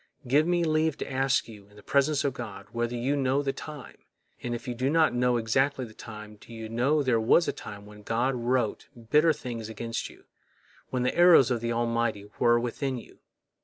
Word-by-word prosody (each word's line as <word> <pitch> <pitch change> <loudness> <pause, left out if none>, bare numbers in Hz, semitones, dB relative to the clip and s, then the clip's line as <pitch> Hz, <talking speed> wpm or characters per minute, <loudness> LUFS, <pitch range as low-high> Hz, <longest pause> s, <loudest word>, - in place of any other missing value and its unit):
Give 145 +6 +3
me 175 -1 +2
leave 155 -1 +1
to - - -6
ask 135 0 +1
you, 105 -3 -13
in 105 - -21
the 105 - -15
presence 140 +3 +2
of 140 - 0
God, 105 -6 -8
whether 120 +1 -2
you 130 +4 0
know 135 0 +1
the 135 -1 -1
time, 150 -4 -9 0.4
and 120 -1 -3
if 120 +2 -8
you 125 - -2
do 130 +3 -1
not 160 -1 +3
know 125 0 +2
exactly 130 +4 +1
the 110 - -13
time, 105 -1 -10
do 110 - -16
you 115 -1 -7
know 135 +6 +1
there 125 -4 +2
was 115 +10 +4
a - - 0
time 105 -1 -9
when 105 0 -13
God 120 +5 0
wrote 120 -2 -1 0.2
bitter 155 +2 +5
things 115 -6 -5
against 115 +1 -4
you, - - -17 0.7
when 125 -1 -1
the 125 - 0
arrows 170 -8 +6
of 120 -2 0
the 120 0 -1
Almighty 115 -3 -1
were 120 0 +4
within 130 +2 -2
you? 120 - -13
120 Hz, 210 wpm, -27 LUFS, 115-140 Hz, 0.7 s, arrows